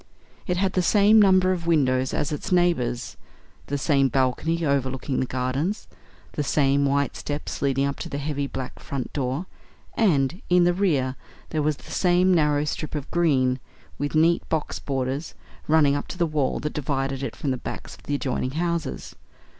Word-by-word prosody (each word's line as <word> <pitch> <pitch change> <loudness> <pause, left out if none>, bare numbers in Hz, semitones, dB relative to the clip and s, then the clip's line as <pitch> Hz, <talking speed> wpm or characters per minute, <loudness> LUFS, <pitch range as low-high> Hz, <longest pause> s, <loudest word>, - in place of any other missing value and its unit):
It 180 -2 0
had 190 +1 +1
the 185 - +2
same 210 +4 +5
number 185 -2 +5
of 170 -2 -3
windows 130 -5 +2
as 150 - -1
its 150 +6 -4
neighbours; 170 -10 +1 0.5
the 145 - -1
same 140 -1 +3
balcony 135 +6 0
overlooking 135 -1 -1
the 130 - 0
gardens; 130 - -2 0.4
the - - -3
same 140 -1 +2
white 140 +1 +1
steps 145 0 -5
leading 135 0 +1
up 140 0 -3
to - - -5
the 140 - -4
heavy 145 -1 -2
black 130 -2 -6
front 135 -3 -5
door; 135 +4 -2 0.5
and, 170 - +2
in 180 0 +5
the 175 0 +3
rear, 145 -9 +1 0.3
there 155 - -1
was 150 -1 0
the - - -13
same 180 0 +3
narrow 150 -3 +3
strip 155 +1 -4
of 145 -2 -5
green, 135 -7 +2 0.4
with 145 +2 -2
neat 165 +2 +4
box 160 -2 -2
borders, 135 +2 -3 0.3
running 150 -2 +4
up 145 - -3
to - - -7
the 175 - +2
wall 150 -4 0
that 150 - -3
divided 135 -2 -2
it 135 - -4
from 140 - -2
the 130 - -1
backs - - -7
of - - -15
the 145 - -2
adjoining 130 -1 -2
houses. 170 -4 -2
145 Hz, 180 wpm, -24 LUFS, 135-170 Hz, 0.5 s, same